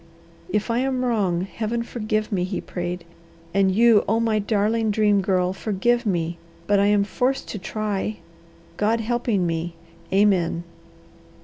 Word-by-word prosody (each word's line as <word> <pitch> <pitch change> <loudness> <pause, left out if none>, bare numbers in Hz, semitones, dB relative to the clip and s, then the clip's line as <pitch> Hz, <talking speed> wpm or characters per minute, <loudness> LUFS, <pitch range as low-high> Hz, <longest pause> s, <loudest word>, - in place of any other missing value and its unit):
"If 210 +2 0
I 230 - +1
am 260 -1 0
wrong, 200 -8 +1
Heaven 225 +4 -3
forgive 215 -2 -2
me," 185 -3 0
he 185 +1 -2
prayed. 175 0 -4 0.5
"And 195 0 +3
you, 225 +1 +5
oh, 225 +2 +2
my 225 -2 +1
darling 215 +2 +1
Dream 210 -1 +3
Girl, 185 -1 +1
forgive 230 +4 0
me, 170 -3 -1 0.3
but 200 +2 +3
I 200 - +4
am 205 -1 +4
forced 250 +6 -1
to 210 - -5
try 210 +1 -3 0.6
God 220 +2 +2
helping 230 -4 0
me! 165 0 -2 0.4
Amen." 190 -4 +2
210 Hz, 145 wpm, -23 LUFS, 185-225 Hz, 0.6 s, you